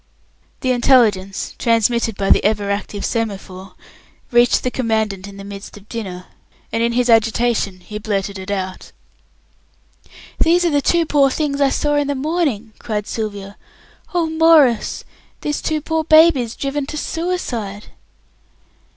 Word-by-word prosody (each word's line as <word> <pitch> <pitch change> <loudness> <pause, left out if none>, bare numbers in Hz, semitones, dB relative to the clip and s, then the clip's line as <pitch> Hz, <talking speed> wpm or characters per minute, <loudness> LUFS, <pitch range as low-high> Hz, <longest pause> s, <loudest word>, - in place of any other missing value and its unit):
The 255 - +1
intelligence, 225 -7 +2
transmitted 230 -1 +1
by 195 -1 +1
the - - +4
ever 205 -1 0
active 200 0 -3
semaphore, 195 -4 -4 0.6
reached 240 0 +4
the 250 - -1
Commandant 220 -6 -1
in 200 0 -11
the 200 - -9
midst 200 +1 -9
of 205 0 -16
dinner, 190 -6 -6 0.5
and 225 - 0
in 235 0 +1
his 245 0 +1
agitation 225 -4 +2
he 210 +3 -7
blurted 200 -2 -3
it 190 - -8
out. 190 -2 -4 1.5
"These 350 +2 +3
are 340 - +2
the 290 -1 +2
two 340 +3 +2
poor 285 -3 +3
things 285 0 -2
I 275 - +4
saw 295 +2 0
in 290 -1 +1
the 285 - -1
morning," 270 -7 -1
cried 210 -2 -3
Sylvia. 205 -3 -5 0.5
"Oh, 345 -2 0
Maurice, 320 -7 +3 0.4
these 295 -1 -2
two 310 -1 -1
poor 320 +1 -1
babies 310 -7 +5
driven 275 0 -3
to 305 - -5
suicide!" 250 - -4
230 Hz, 145 wpm, -19 LUFS, 205-290 Hz, 1.5 s, babies